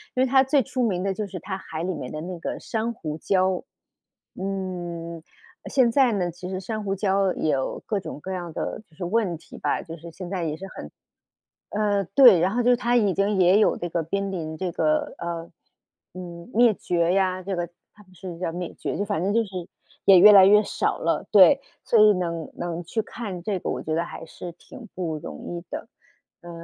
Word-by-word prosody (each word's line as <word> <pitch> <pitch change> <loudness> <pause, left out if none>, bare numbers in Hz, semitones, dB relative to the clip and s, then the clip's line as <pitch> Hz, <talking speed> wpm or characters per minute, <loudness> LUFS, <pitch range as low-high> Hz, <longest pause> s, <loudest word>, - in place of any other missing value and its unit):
因 255 - +3
为 - - +4
它 265 +1 +5
最 270 0 +2
出 255 +3 -3
名 185 -2 -1
的 195 - 0
就 210 +1 -4
是 185 -2 -7
它 190 0 -4
海 160 -3 -6
里 185 +1 -1
面 125 - -6
的 155 - -5
那 175 +1 -6
个 - - -4
珊 230 +1 -2
瑚 155 -6 -5
礁。 185 +1 +1 0.8
嗯， 175 -4 -4 0.5
现 255 -4 +3
在 260 0 +4
呢， 180 -4 -1
其 180 +2 -8
实 185 0 -3
珊 215 +3 -4
瑚 195 -1 -1
礁 195 -1 +1
有 140 -4 -1
各 210 -3 -1
种 190 - -7
各 190 - -6
样 175 -2 -4
的 - - -4
就 160 - -25
是 175 - -6
问 185 -3 0
题 - - -14
吧， - - -1
就 165 - -8
是 170 +1 -10
现 175 +2 -8
在 185 -3 -2
也 155 -1 -3
是 195 - -8
很 75 - -8 0.8
呃， 205 -1 +1
对， 245 -9 +9
然 180 - +2
后 245 +2 +1
就 245 - +1
是 245 - +5
它 240 0 0
已 205 -6 +3
经 200 +1 +1
也 185 +3 +6
有 - - +4
这 175 - -4
个 170 - -1
濒 200 +4 -2
临 160 -4 -4
这 185 +2 -3
个， 155 -1 0
呃， 170 -1 -5 0.6
嗯， 175 +1 -9
灭 235 -1 +5
绝 170 -2 0
呀， 185 -1 +1
这 190 0 -3
个 175 - -1 0.3
他 210 - -17
们 185 -1 -22
是 180 -2 -8
叫 170 -2 -2
灭 175 0 -5
绝， - - -3
就 205 - 0
反 200 -5 -2
正 200 +2 0
就 230 - +3
是 185 -4 -6 0.4
也 190 -2 +9
越 210 +3 +9
来 195 -2 +9
越 210 +2 +6
少 - - -1
了。 - - -1
对， - - +7 0.2
所 230 - +3
以 210 0 +8
能 170 -3 -3
能 175 0 -4
去 220 +6 -2
看 200 -5 -7
这 195 +1 -1
个， - - -5
我 - - -3
觉 155 - -2
得 165 +1 0
还 165 - -8
是 175 +2 -8
挺 225 +7 -13
不 165 -4 -3
容 160 - -8 0.2
易 170 - -10
的。 - - -6 0.5
呃， 175 - -11
185 Hz, 240 characters per minute, -24 LUFS, 170-205 Hz, 0.8 s, 对